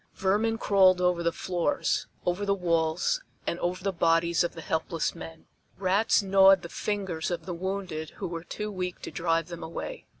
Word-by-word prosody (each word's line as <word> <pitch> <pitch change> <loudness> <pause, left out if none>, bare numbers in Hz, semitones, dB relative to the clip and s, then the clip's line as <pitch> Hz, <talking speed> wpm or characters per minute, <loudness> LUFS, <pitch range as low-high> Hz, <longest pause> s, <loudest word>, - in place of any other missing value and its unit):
Vermin 210 +4 +1
crawled 190 -4 +5
over 180 -1 +2
the 170 0 +1
floors, 175 -3 -1 0.2
over 180 +3 0
the 200 0 +2
walls 165 -2 +1 0.2
and 170 - -2
over 180 +1 -2
the 195 -1 0
bodies 165 0 +3
of 175 - -3
the 165 - -7
helpless 160 0 -1
men. 165 -1 -10 0.3
Rats 200 +3 +2
gnawed 195 -1 +6
the 170 - -7
fingers 190 -7 -2
of 170 -2 -3
the 180 - -4
wounded 180 -3 -4
who - - -3
were 165 -1 -5
too 210 +4 -5
weak 180 -2 -4
to - - -5
drive 165 -1 0
them 170 - -7
away. 170 - -6
180 Hz, 180 wpm, -28 LUFS, 165-195 Hz, 0.3 s, gnawed